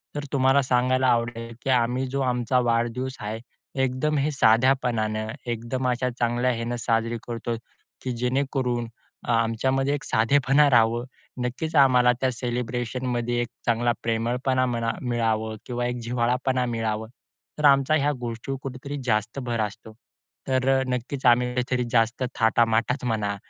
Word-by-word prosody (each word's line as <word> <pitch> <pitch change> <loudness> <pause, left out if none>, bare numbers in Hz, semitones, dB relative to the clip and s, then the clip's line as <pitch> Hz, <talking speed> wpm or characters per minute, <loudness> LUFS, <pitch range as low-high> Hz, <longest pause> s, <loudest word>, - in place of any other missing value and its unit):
तर 145 - -3
तुम्हाला 135 +1 +4
सांगायला 130 +1 +2
आवडेल 115 -1 0
की 135 - -3
आम्ही 125 +1 +2
जो 140 +1 -2
आमचा 125 0 +1
वाढदिवस 120 +3 -1
आहे. 105 +2 -4 0.4
एकदम 130 +4 0
हे 145 +2 +1
साध्यापणानं, 115 -3 +2 0.2
एकदम 120 +3 -2
अशा 125 +1 0
चांगल्या 120 +1 +1
ह्यानं 115 +1 -3
साजरी 115 0 0
करतो 115 0 -3 0.5
की 130 - -3
जेणेकरून 125 -1 -1 0.4
अ, - - +1
आमच्यामध्ये 130 +5 +1
एक 145 - -6
साधेपणा 140 +5 +3
राहावं. 120 0 +4 0.4
नक्कीचं 150 +6 -2
आम्हाला 125 -2 +5
त्या 130 -1 +2
सेलिब्रेशनमध्ये 120 0 -2
एक 120 - -2 0.2
चांगला 120 +1 +2
प्रेमळपणा 125 +3 0
म्हणा 115 -2 -1
मिळावं 110 -3 -1
किंवा 120 -1 -2
एक 125 0 -1
जिव्हाळापणा 125 +2 0
मिळावं. 110 -2 -2 0.5
तर 150 - +1
आमचा 140 +2 +5
ह्या 145 0 +2
गोष्टीवर 120 +3 -4
कुठेतरी 135 +2 -6
जास्त 110 +2 0
भर 120 -3 -3
असतो. 110 +1 -5 0.5
तर 130 -1 +1 0.2
नक्कीचं 125 +1 0
आम्ही 125 +1 +4
काहीतरी 125 0 0
जास्त 115 +2 +2
थाटामाटात 115 +3 +2
म्हणा 105 -3 -1
125 Hz, 140 wpm, -25 LUFS, 115-130 Hz, 0.5 s, आम्हाला